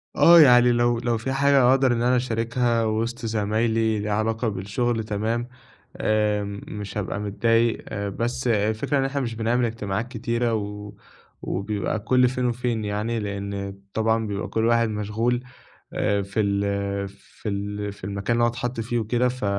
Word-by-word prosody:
آه، 170 0 +8
يعني 125 -3 +7
لو 120 0 +2
لو 120 -1 0
في 130 +4 -3
حاجة 135 -2 +4
أقدر 130 -2 +4
إن 115 - -1
أنا 125 +1 +3
أشاركها 115 -1 0
وِسط 115 +2 -2
زمايلي 110 0 +1
ليها 105 0 -3
علاقة 115 +2 0
بالشُغل 110 +4 -1
تمام 110 +3 -2 0.5
آآ 105 -1 +1
م 100 0 -6
مش 105 0 -6
هابقى 100 0 -3
متضايق، 115 +3 0
بس 115 +5 -2
الفكرة 110 +5 +1
إن 135 - +1
إحنا 140 +1 -2
مش 115 -2 -3
بنعمل 120 +2 +1
اجتماعات 110 0 -3
كتيرة 120 -1 -1
و 105 -1 -4 0.5
وبيبقى 100 +2 -2
كل 125 +3 +3
فين 125 -1 -2
وفين 120 -2 -1
يعني 105 +3 -2
لإن 100 -1 -4 0.2
طبعًا 110 0 +1
بيبقى 100 0 -3
كل 110 0 0
واحد 115 -1 +3
مشغول 110 +4 -1 0.5
آآ 100 0 +1
في 100 +2 -4
ال 100 -1 0
في 105 +2 -9
ال 105 0 -3
في - - -19
المكان 100 +3 -2
اللي 120 - +2
هو - - +5
اتحَط 120 0 -4
فيه 115 +1 -1
وكده، 120 +3 +1
ف 125 -4 -4
110 Hz, 165 wpm, -24 LUFS, 105-120 Hz, 0.5 s, آه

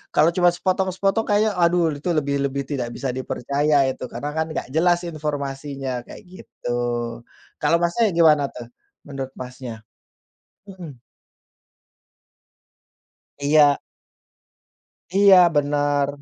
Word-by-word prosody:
kalau 155 - +5
cuma 175 -1 +4
sepotong-sepotong 190 +3 0
kayaknya, 210 0 +2
aduh, 170 -1 +3
itu 145 - -8
lebih 140 -2 0
lebih 140 0 -4
tidak 125 -5 -3
bisa 135 -2 -3
dipercaya 140 +3 0
itu 130 - -7
karena 145 +5 -5
kan 160 - 0
enggak 155 - -5
jelas 175 +2 +3
informasinya, 140 -4 -4
kayak - - -12
gitu. 120 -9 -6 0.8
Kalau 155 +3 +3
Masnya 210 +5 +2
gimana, 150 -4 +4
tuh, 120 -2 -9 0.4
menurut 135 -2 -6
Masnya? 125 -3 -8 0.9
Mhm. 175 -8 -10 2.4
Iya. 145 0 +4 1.4
Iya, 200 -1 +7 0.2
bener. 145 -1 +1
145 Hz, 105 wpm, -22 LUFS, 135-175 Hz, 2.4 s, Iya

